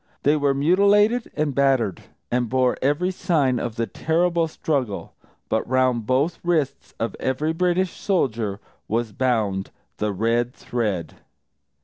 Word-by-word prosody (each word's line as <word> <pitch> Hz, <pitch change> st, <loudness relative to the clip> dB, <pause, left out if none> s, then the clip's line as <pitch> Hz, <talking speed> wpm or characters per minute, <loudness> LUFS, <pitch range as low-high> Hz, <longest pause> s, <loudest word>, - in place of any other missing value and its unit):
They 145 Hz, +2 st, +4 dB
were 140 Hz, -2 st, +1 dB
mutilated 200 Hz, -, +3 dB
and 150 Hz, -2 st, 0 dB
battered, 130 Hz, -8 st, +2 dB, 0.3 s
and 120 Hz, -1 st, 0 dB
bore 130 Hz, 0 st, +2 dB
every 145 Hz, +7 st, +1 dB
sign 145 Hz, -9 st, +1 dB
of 115 Hz, -2 st, -4 dB
the 115 Hz, -, 0 dB
terrible 170 Hz, +4 st, +1 dB
struggle. 140 Hz, -9 st, -2 dB, 0.3 s
_But -, -, +1 dB
round 130 Hz, -3 st, +1 dB
both 140 Hz, +6 st, +1 dB
wrists 160 Hz, -6 st, -1 dB
of 115 Hz, -3 st, -2 dB
every 150 Hz, +5 st, 0 dB
British 180 Hz, +1 st, +1 dB
soldier 115 Hz, -, -1 dB, 0.3 s
was 115 Hz, 0 st, -1 dB
bound 105 Hz, -5 st, 0 dB, 0.3 s
the 105 Hz, 0 st, -1 dB
red 115 Hz, +4 st, 0 dB
thread! 105 Hz, -8 st, -3 dB
130 Hz, 130 wpm, -23 LUFS, 115-165 Hz, 0.3 s, They